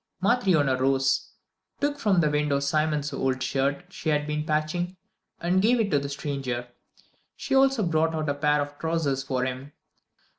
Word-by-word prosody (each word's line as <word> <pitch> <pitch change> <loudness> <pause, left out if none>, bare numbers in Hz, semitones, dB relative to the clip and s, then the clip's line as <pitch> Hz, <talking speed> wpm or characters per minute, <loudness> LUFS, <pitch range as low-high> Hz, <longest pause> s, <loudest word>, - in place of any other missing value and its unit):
Matryona 185 - +2
rose, 135 0 +1 0.5
took 290 0 -1
from 200 -8 +3
the 150 - +2
window 150 -1 +1
Simon's 150 0 0
old 130 -1 -1
shirt 140 +5 -1
she 160 - -3
had 150 -1 +1
been 150 0 -2
patching, 175 +4 -1 0.4
and 180 +2 +2
gave 235 +4 +3
it 205 -3 0
to 145 - +3
the 140 0 -5
stranger. 135 -4 -4 0.7
She - - -4
also 270 -3 +4
brought 160 -1 +1
out 155 -1 -2
a 145 - +1
pair 150 +1 +2
of 145 0 -11
trousers 160 -5 0
for 130 -1 -1
him. 130 +3 -5
150 Hz, 170 wpm, -26 LUFS, 140-175 Hz, 0.7 s, also